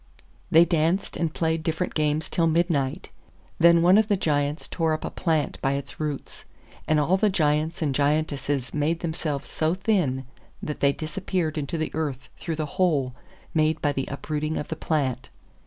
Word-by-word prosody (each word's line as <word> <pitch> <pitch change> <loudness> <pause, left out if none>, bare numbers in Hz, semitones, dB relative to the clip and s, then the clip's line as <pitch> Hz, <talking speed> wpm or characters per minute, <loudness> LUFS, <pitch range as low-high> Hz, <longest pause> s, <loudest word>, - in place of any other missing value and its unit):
They 165 +2 +7
danced 170 +3 +1
and 165 -2 -1
played 160 0 0
different 160 +2 -2
games 155 0 0
till 165 -1 +1
midnight; 160 -2 0 0.5
then 170 0 +6
one 185 +4 +7
of 220 - +2
the 205 -2 +2
Giants 145 -2 0
tore 165 -2 0
up 155 - -3
a - - -4
plant 160 -4 -1
by 135 0 +1
its 140 0 -5
roots, 150 -3 -4 0.4
and 155 -1 +3
all 170 +6 +3
the 210 +2 +3
Giants 160 -2 +1
and 145 -3 0
Giantesses 145 -2 0
made 155 +3 0
themselves 160 -4 -3
so 160 +2 0
thin 175 - 0 0.3
that 150 - -5
they 140 - +4
disappeared 165 +1 -2
into 150 +1 -3
the 155 -1 -3
earth 145 -5 -3
through 165 - -3
the 155 0 -2 0.2
hole 140 -8 +2 0.4
made 155 0 +2
by 145 - +1
the 135 -1 -3
uprooting 150 +2 -3
of - - -4
the 160 - -2
plant. 130 -6 -1
155 Hz, 175 wpm, -25 LUFS, 145-170 Hz, 0.5 s, They